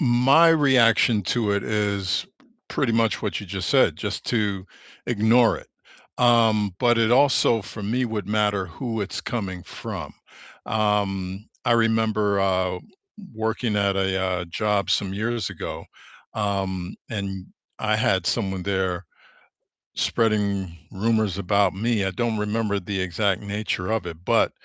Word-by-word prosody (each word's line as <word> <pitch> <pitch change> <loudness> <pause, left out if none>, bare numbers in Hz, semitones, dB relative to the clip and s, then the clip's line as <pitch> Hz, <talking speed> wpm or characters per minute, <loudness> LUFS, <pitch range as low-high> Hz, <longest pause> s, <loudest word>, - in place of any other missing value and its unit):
my 135 +5 +5
reaction 125 -8 +4
to 105 +2 0
it 100 - 0
is 100 - -1
p 270 - -28 0.2
pretty 130 -5 0
much 115 -2 +1
what - - -2
you - - -9
just - - -4
said, - - +4
just - - -4
to 100 -5 -1 0.4
ignore 115 +1 +3
it. - - -16 0.5
Um, 110 -5 +3
but 120 -2 +3
it 115 -1 +3
also 125 -4 +4
for 105 - -9
me 120 +5 0
would 110 -4 -3
matter 105 -2 +1
who 115 +6 -5
it's 100 - -4
coming 95 -7 -4
from. - - -7 0.5
Um, 100 -2 -1 0.2
I - - +3
remember, 110 -3 +2
uh, 95 -1 +1 0.6
working 110 0 -1
at 100 -1 +1
a, 95 -1 0
uh, 90 -1 -1
job 100 +2 -1
some 95 -1 0
years 110 0 -2
ago, - - -6 0.5
um, 95 -3 -2
and 95 -4 -4 0.3
I 110 -1 +1
had 95 -4 +1
someone 95 -3 -1
there 95 -2 -1 0.9
spreading 100 -6 0
rumors 110 -1 0
about 100 0 +2
me, 110 +1 0
I 95 - -1
don't 115 +3 -1
remember 105 -1 -1
the 95 +1 -3
exact 95 +2 0
nature 100 -3 -3
of 110 -5 -1
it, 85 -2 -6
but, - - +3
105 Hz, 145 wpm, -24 LUFS, 95-115 Hz, 0.9 s, my